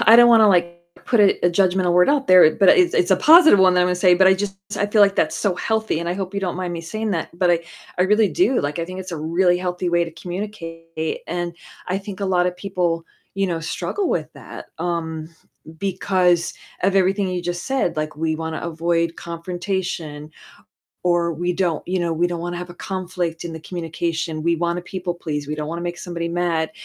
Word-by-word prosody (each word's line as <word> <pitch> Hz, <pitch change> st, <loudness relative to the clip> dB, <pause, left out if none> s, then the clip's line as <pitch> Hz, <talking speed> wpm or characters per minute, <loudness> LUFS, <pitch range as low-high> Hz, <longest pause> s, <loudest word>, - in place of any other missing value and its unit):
I 225 Hz, +1 st, +8 dB
don't 240 Hz, 0 st, +8 dB
wanna, 225 Hz, -2 st, +6 dB
like, 175 Hz, -2 st, +2 dB, 0.3 s
put 235 Hz, -4 st, +2 dB
a 200 Hz, -3 st, +3 dB
a -, -, +3 dB
judgmental 185 Hz, 0 st, +2 dB
word 180 Hz, +1 st, +4 dB
out 280 Hz, -1 st, +2 dB
there, 180 Hz, -4 st, +7 dB
but 195 Hz, -, +3 dB
it's 360 Hz, -2 st, +4 dB
it's 180 Hz, -, +2 dB
a 190 Hz, -, +5 dB
positive 315 Hz, -, +7 dB
one 185 Hz, -1 st, +5 dB
that 180 Hz, -, +3 dB
I'm 180 Hz, -, +3 dB
gonna 180 Hz, -, +1 dB
say, 180 Hz, 0 st, +5 dB
but 190 Hz, +1 st, +4 dB
I 190 Hz, -, +6 dB
just 195 Hz, 0 st, -4 dB, 0.2 s
I 205 Hz, -, 0 dB
feel 210 Hz, +1 st, +2 dB
like 200 Hz, -1 st, +3 dB
that's 160 Hz, 0 st, +1 dB
so 190 Hz, +3 st, 0 dB
healthy, 220 Hz, -1 st, -1 dB
and 170 Hz, -, -3 dB
I 175 Hz, -, -1 dB
hope 190 Hz, 0 st, -5 dB
you 200 Hz, -, -1 dB
don't 180 Hz, -2 st, -3 dB
mind 180 Hz, -1 st, -3 dB
me 170 Hz, -, -4 dB
saying 215 Hz, +6 st, -4 dB
that. 170 Hz, -1 st, -4 dB
But 180 Hz, -1 st, +3 dB
I 170 Hz, -, +2 dB, 0.4 s
I -, -, +4 dB
really 210 Hz, +2 st, +3 dB
do, 345 Hz, -8 st, +2 dB
like, 145 Hz, +3 st, -3 dB
I 170 Hz, -, -1 dB
think 185 Hz, +2 st, -7 dB
it's 185 Hz, -1 st, -8 dB
a -, -, -3 dB
really 175 Hz, +3 st, +1 dB
healthy 180 Hz, 0 st, -2 dB
way 170 Hz, 0 st, +2 dB
to 165 Hz, -, -8 dB
communicate, 165 Hz, -3 st, -6 dB
and, 175 Hz, 0 st, -3 dB, 0.3 s
I 185 Hz, +1 st, 0 dB
think 200 Hz, 0 st, -9 dB
a 200 Hz, -, -1 dB
lot 180 Hz, -1 st, +2 dB
of 180 Hz, 0 st, -3 dB
people, 180 Hz, -3 st, -2 dB, 0.3 s
you 195 Hz, 0 st, 0 dB
know, 170 Hz, -3 st, -2 dB
struggle 375 Hz, -, -3 dB
with -, -, -2 dB
that, -, -, -10 dB
um, 160 Hz, -2 st, -3 dB, 0.5 s
because 180 Hz, -2 st, +1 dB, 0.3 s
of 195 Hz, +1 st, +2 dB
everything 195 Hz, +1 st, +2 dB
you 180 Hz, -1 st, -3 dB
just 175 Hz, 0 st, -4 dB
said, 260 Hz, -11 st, -1 dB
like, 155 Hz, 0 st, -3 dB
we 160 Hz, 0 st, -1 dB
wanna 160 Hz, 0 st, -4 dB
avoid 170 Hz, 0 st, -1 dB
confrontation, 170 Hz, -3 st, -5 dB, 0.7 s
or 175 Hz, -1 st, +1 dB
we 175 Hz, +3 st, -2 dB
don't 170 Hz, -5 st, -1 dB
you 185 Hz, -, 0 dB
know, 170 Hz, -1 st, -1 dB
we 170 Hz, +2 st, +1 dB
don't 175 Hz, -1 st, -4 dB
wanna 175 Hz, 0 st, -4 dB
have 180 Hz, 0 st, -7 dB
a -, -, -11 dB
conflict 180 Hz, -3 st, -4 dB
in 170 Hz, -, -5 dB
the 160 Hz, -, -8 dB
communication, 165 Hz, -2 st, -4 dB
we 170 Hz, +1 st, +2 dB
wanna 170 Hz, +1 st, -2 dB
people 180 Hz, -1 st, -4 dB
please, 150 Hz, -4 st, -5 dB
we 150 Hz, -, -2 dB
don't 150 Hz, 0 st, -4 dB
wanna 170 Hz, +1 st, -4 dB
make 175 Hz, 0 st, -4 dB
somebody 170 Hz, -2 st, -4 dB
mad, 170 Hz, -2 st, -1 dB
175 Hz, 230 wpm, -21 LUFS, 170-190 Hz, 0.7 s, I